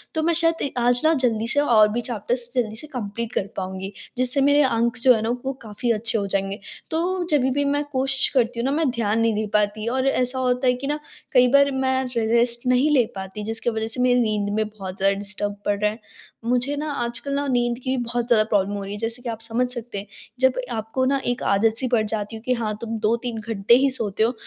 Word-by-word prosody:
तो 315 - +1
मैं 335 +1 +2
शायद 330 -3 +1
आज 245 0 +3
न 320 - +5
जल्दी 230 -4 +1
से 285 +5 +4
और 225 -7 +5
भी 240 +3 -1
चैप्टर्स 235 +1 -2
जल्दी 225 -4 -1
से 300 +7 -6
कंप्लीट 235 -3 -5
कर 195 - -1
पाऊँगी। 190 0 -4 0.3
जिससे 255 +2 +2
मेरे 285 +1 +5
अंक 235 -1 +1
जो 255 +1 +7
हैं 220 - -1
न - - -1 0.2
वो 270 - -1
काफ़ी 220 +2 -2
अच्छे 225 +1 0
हो 200 - -1
जाएँगे। 195 +1 -2 0.3
तो 355 +3 0
जभी 265 -3 +3
भी 285 +2 0
मैं 285 +1 +1
क़ोशिश 270 0 +1
करती 235 -1 +1
हूँ 240 - 0
न - - 0
मैं 315 -3 +2
ध्यान 225 -2 0
नहीं 230 0 +2
दे 215 +1 -1
पाती 210 +1 +1
और 260 +2 0
ऐसा 255 -1 +1
होता 250 0 +1
है 250 - +5
कि 255 +3 -5
न 295 - 0 0.4
कई 250 -1 +6
बार 280 0 +5
मैं 265 0 0
रे 230 - +1
रेस्ट 235 +1 +3
नहीं 255 +4 +3
ले 260 -5 +4
पाती 190 +2 -6
जिसकी 225 +2 -1
वज़ह 220 -1 -2
से 240 +3 -2
मेरी 250 0 +4
नींद 215 -3 0
में 215 0 0
बहुत 195 -3 -8
ज़्यादा 195 +1 +2
डिस्टर्ब 205 0 -3
पड़ 205 -1 0
रहा 210 0 +2
है। 220 - -10 0.5
मुझे 250 +4 0
न 295 - -3
आजकल 275 -2 -3
न 285 - -2
नींद 240 -1 +1
की 260 0 0
भी 245 - -1
बहुत 240 0 -2
ज़्यादा 225 -3 +5
प्रॉब्लम 205 -2 0
हो 200 - -4
रही 195 - -7
है - - -5
जैसे 230 +2 -2
कि 240 - -4
आप 225 - -4
समझ 230 +2 -1
सकते 240 -3 -6
हैं। 200 +1 -6 0.3
जब 260 0 +4 0.2
आपको 225 +3 -2
न 275 +1 +2
एक 245 0 -1
आदत-सी 225 +5 +1
पड़ 235 -3 +2
जाती 210 0 -3
हूँ 220 - -10
क्योंकि 250 -1 0
हाँ 215 -1 -2
तुम 230 -1 -3
2-3 230 +1 -1
घंटे 220 0 +1
ही 270 +2 +4
सोते 220 -5 -1
हो 235 - +2
235 Hz, 245 wpm, -23 LUFS, 215-260 Hz, 0.5 s, जो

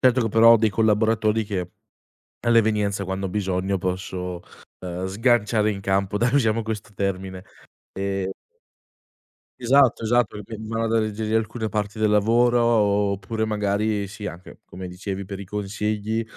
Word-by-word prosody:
Certo 130 -1 +4
che 115 - 0
però 115 +2 +7
ho - - +7
dei 110 -1 +2
collaboratori 110 0 +2
che 90 -4 -4 0.8
all'evenienza 105 -3 +2
quando 95 +1 -3
ho - - -4
bisogno 95 0 -1
posso, 90 -1 -4 0.4
uhm, 90 0 -4
sganciare 110 +1 +2
in 100 - -6
campo, 95 +1 0
dai 120 +3 +1
usiamo 115 -4 +2
questo 105 -1 -5
termine. 95 -1 -3 0.5
E 95 -1 -2 1.3
Esatto, 130 0 +4
esatto, 120 -1 +1
che 105 - -7
poi 110 +2 -9
v 110 - -8
vanno 115 0 -1
ad 115 - -1
alleggerire 110 0 -1
alcune 110 0 -2
parti 105 +1 -3
del 110 -1 +2
lavoro 120 +4 +3
o 105 -4 +2
oppure 110 +3 -3
magari 105 0 0
sì, 100 +1 -8
anche 85 +2 -9
come 90 +1 -8
dicevi 95 +2 -5
per 100 +1 -7
i 100 - -8
consigli 105 +2 -2
105 Hz, 160 wpm, -23 LUFS, 95-110 Hz, 1.3 s, però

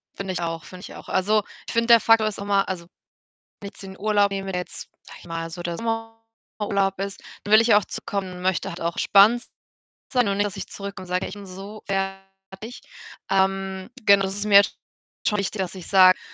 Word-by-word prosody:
Finde 195 -1 -4
ich 180 - -3
auch, 165 -1 -3
finde 185 -1 -11
ich - - -10
auch. - - -11
Also, 210 +3 +2 0.2
ich - - -5
finde, 230 0 +1
der 235 -1 +8
Faktor 225 -1 +4
ist 215 - -4
immer 200 -1 +1
also, 180 -2 -4 0.8
wenn 200 - -6
ich - - -11
jetzt - - -13
den 190 0 -10
Urlaub 205 -1 +2
nehme, 195 0 -3
der 180 -1 -1
jetzt, 180 - -9
sage - - -13
ich - - -15
mal 165 -1 -4
so 175 +1 -7
der 170 -1 -3
Sommerurlaub 225 -3 -3
ist, 195 0 -5 0.2
dann 205 - 0
will 215 - +9
ich 230 - +1
ja 215 -3 +7
auch 210 - +1
zurückkommen 190 -2 -4
und 180 - -9
möchte 185 0 0
halt 170 - -8
auch 170 +1 -1
entspannt 215 +5 +5 0.7
sein 245 -4 +3
und 200 - 0
nicht, 205 +1 +2
dass 205 0 -6
ich 195 - -5
zurückkomme 200 -1 -7
und - - -15
sage: 180 +1 -1
„Ich - - -7
bin 205 -1 -10
so 195 +3 -9
fertig.“ 195 +3 -5 0.5
Ähm, 190 0 0
genau 200 -1 +6
das 190 +1 -3
ist 205 - -3
mir 200 -1 +8 0.6
schon 210 - +2
wichtig, 200 +1 -2
dass 185 0 -3
ich 185 - -9
sage, 185 -1 +7
195 Hz, 230 wpm, -24 LUFS, 190-210 Hz, 0.8 s, will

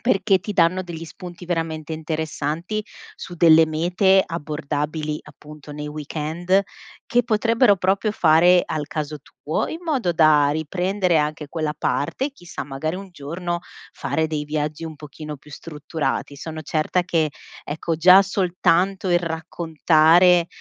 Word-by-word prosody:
perché 200 -4 +2
ti 210 +4 -6
danno 185 0 +2
degli 170 -2 -7
spunti 175 +1 -10
veramente 165 -2 -3
interessanti 160 +4 -3 0.3
su 175 - -8
delle 160 -1 +6
mete 180 +5 +3
abbordabili, 150 -1 -3
appunto, 150 -1 -13
nei 150 0 -6
weekend 160 +5 -1 0.4
che 245 +1 +2
potrebbero 230 -1 +3
proprio 195 +3 0
fare 175 +1 +5
al 150 -2 -3
caso 150 -1 -4
tuo, 150 +3 -4
in 320 - -6
modo 265 - 0
da 155 -3 +4
riprendere 180 +3 0
anche 150 0 -2
quella 155 -2 -3
parte, 260 - -1
chissà, 175 -11 -8
magari 145 +4 -4
un 195 +1 -7
giorno 175 +3 -4 0.3
fare 140 +4 -2
dei 150 -1 -3
viaggi 150 +1 -3
un 160 - -7
pochino 150 0 -9
più 150 - -18
strutturati. 150 -2 -4
Sono 160 +2 -7
certa 155 +4 0
che, 165 -3 0 0.3
ecco, 160 +2 -3
già 185 +4 +7
soltanto 190 0 +1
il 175 -1 +4
raccontare 165 +1 +3
165 Hz, 135 wpm, -22 LUFS, 150-180 Hz, 0.4 s, già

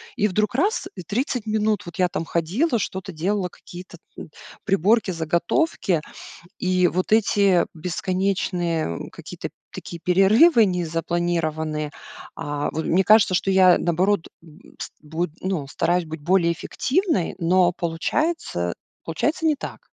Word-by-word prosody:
и 210 - +2
вдруг 210 +2 -1
раз, 400 - +1
и 180 - -7
30 235 - -2
минут 215 -1 0
вот 170 -2 -9
я 180 - +3
там 165 - -3
ходила, 210 - 0
что-то 190 0 -4
делала, 185 +4 -1
какие-то, 180 +1 -12 0.2
м, - - -9 0.4
приборки, 195 +2 +2
заготовки. 170 - 0 0.6
И 185 -1 +2
вот 185 +4 -2
эти, 200 -5 +4
бесконечные, 180 - -2
э, - - -11
какие-то - - -8 0.2
такие 170 - -8
перерывы 215 - +5
незапланированные, 165 -3 -2 0.4
а, 145 0 -3
вот 160 - -3
мне 190 +3 +3
кажется, 210 -1 +5
что 195 +2 +1
я, 185 -2 +6
наоборот, 180 +2 +1 0.2
м, 155 -2 -18
с - - -6
буд 160 +3 -3
ну, 185 -7 -2
стараюсь 175 +4 0
быть 155 -1 -8
более 170 +1 +2
эффективной, 305 - -1
но 175 +1 +3
получается, 170 - -2 0.3
получается 300 - -1
не 310 -2 +3
так. - - -7
180 Hz, 135 wpm, -23 LUFS, 165-205 Hz, 0.6 s, я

